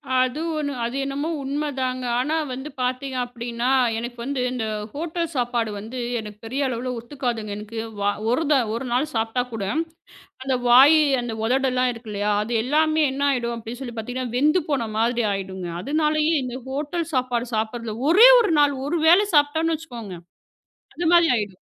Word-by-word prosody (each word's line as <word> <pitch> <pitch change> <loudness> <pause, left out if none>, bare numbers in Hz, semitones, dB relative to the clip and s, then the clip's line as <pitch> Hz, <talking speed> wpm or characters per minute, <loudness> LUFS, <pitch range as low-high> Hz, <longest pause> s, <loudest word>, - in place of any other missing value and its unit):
அது 255 +3 +1 0.2
ஒன்னு. 285 -2 -2
அது 240 +3 -4
என்னமோ 280 +3 -3
உண்மதாங்க. 265 -3 -2 0.2
ஆனா 300 +5 0 0.2
வந்து 265 +4 -6
பாத்தீங்க 255 +1 -2
அப்புடின்னா 240 0 -3 0.3
எனக்கு 240 +1 -6
வந்து 275 0 -2
இந்த 245 -3 -2 0.3
ஹோட்டல் 335 +2 -3
சாப்பாடு 240 -2 0
வந்து 230 +5 -7 0.2
எனக்குப் 210 0 -10
பெரிய 270 +4 -1
அளவுல 250 0 -3
ஒத்துக்காதுங்க. 235 -4 -4
எனக்கு 215 +2 -7 0.2
வ - - -1 0.3
ஒரு 315 +6 +1
த 295 - +6 0.2
ஒரு 240 +3 -3
நாள் 260 +5 0
சாப்பிட்டா 225 +2 0
கூட 220 -3 -3 0.8
அந்த 265 -1 0
வாய் 270 +6 +8 0.2
அந்த 240 -1 -4
உதடுல்லாம் 255 +1 +1
இருக்கு 230 -1 -11
இல்லையா? 205 +1 -1
அது 235 - -4
எல்லாமே 310 +4 +2
என்ன 280 +1 -3
ஆயிடும் 235 -3 -1
அப்படின்னு 235 +3 -8
சொல்லி 240 -3 -6
பாத்தீங்கன்னா 245 +1 -4
வெந்து 305 +6 +3
போன 240 -6 0
மாதிரி 235 +1 +1
ஆயிடுங்க. 190 -2 -4
அதனாலே 305 +3 +1 0.2
இந்த 250 0 -5
ஹோட்டல் 300 +4 -3
சாப்பாடு 250 -2 0
சாப்பிடறது 220 0 -3 0.2
ஒரே 440 +7 +9
ஒரு 440 -6 +2
நாள். 285 -1 +4
ஒரு 335 +2 0
வேளை 365 +5 +6
சாப்பிட்டோம்னு 320 +3 +3
வச்சுக்கோங்க. 240 - -8 0.8
அது 345 - -2
மாதிரி 340 -1 +6
ஆயிடும். 200 -4 -4
255 Hz, 165 wpm, -23 LUFS, 235-290 Hz, 0.8 s, ஒரே